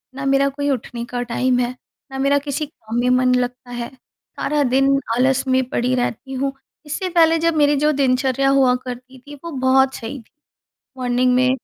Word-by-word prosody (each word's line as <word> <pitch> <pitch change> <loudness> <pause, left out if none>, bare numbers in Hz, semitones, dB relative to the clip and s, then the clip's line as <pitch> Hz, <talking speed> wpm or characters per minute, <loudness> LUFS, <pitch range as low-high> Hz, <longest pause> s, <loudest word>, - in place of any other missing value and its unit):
ना 275 +1 -5
मेरा 275 0 +3
कोई 285 +1 -3
उठने 240 -2 -3
का 245 -1 -2
टाइम 245 +1 0
है, 245 0 0 0.4
ना 270 - -6
मेरा 275 +1 +3
किसी 285 +2 -2
काम 230 -5 -6
में 250 +1 +1
मन 255 0 +3
लगता 245 0 -3
है 240 -1 -5
सारा 290 +3 -4
दिन 270 +1 +4 0.3
आलस 260 +1 +2
में 260 0 +2
पड़ी 250 +1 0
रहती 250 +2 -3
हूँ। 270 +1 -1 0.3
इससे 365 +6 -3
पहले 330 -2 +4
जब 335 0 +1
मेरी 290 -1 +4
जो 300 +2 +2
दिनचर्या 270 -1 +1
हुआ 270 -2 +4
करती 255 +1 -8
थी 290 - -9
वो 335 - -6
बहुत 265 -1 +2
सही 245 +5 -6
थी। 225 - -20 0.7
मॉर्निंग 250 0 +1
में 255 0 +3
260 Hz, 190 wpm, -20 LUFS, 250-275 Hz, 0.7 s, दिन